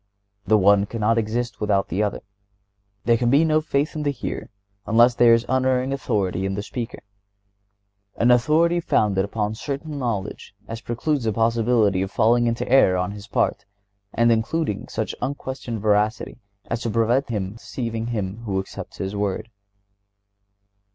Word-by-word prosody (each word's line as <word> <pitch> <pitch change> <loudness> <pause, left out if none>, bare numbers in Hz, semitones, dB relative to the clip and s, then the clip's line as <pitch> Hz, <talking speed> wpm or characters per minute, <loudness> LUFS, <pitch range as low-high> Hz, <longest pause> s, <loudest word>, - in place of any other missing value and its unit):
The 110 - +5
one 100 0 +4
cannot 115 +1 +1
exist 115 +2 -3
without 100 -2 +1
the 95 - -1
other. 105 -1 -1 0.8
There 115 -1 +4
can 120 0 +1
be 145 +6 +4
no 155 -1 +3
faith 150 0 -1
in 155 - -3
the 145 - 0
hearer 140 - -5 0.4
unless 120 +3 +5
there 120 -1 +6
is 115 +1 -1
unerring 130 0 +1
authority 100 -8 -1
in 95 0 -2
the 100 - -3
speaker—an 100 -1 -6
authority 155 +8 +3
founded 105 - +1
upon 105 +1 -2
such 110 - -10
certain 145 +1 -4
knowledge 105 -5 -4
as 115 0 -6
precludes 130 +2 -2
the 110 - +1
possibility 115 -3 +2
of 95 - -2
falling 120 +3 +3
into 115 0 -1
error 120 -8 +5
on 90 +2 -1
his 105 0 -9
part, - - 0 0.5
and 115 0 +3
including 115 0 -1
such 110 -1 -3
unquestioned 130 -3 -4
veracity 105 +3 0 0.3
as 115 0 -3
to 115 - -2
prevent 115 +5 +1
his 105 -2 -3
deceiving 115 -3 -4
him 105 -4 -3
who 95 -3 -1
accepts 95 - -8
his 95 +2 -4
word. 100 +2 -2
115 Hz, 160 wpm, -23 LUFS, 100-125 Hz, 0.8 s, there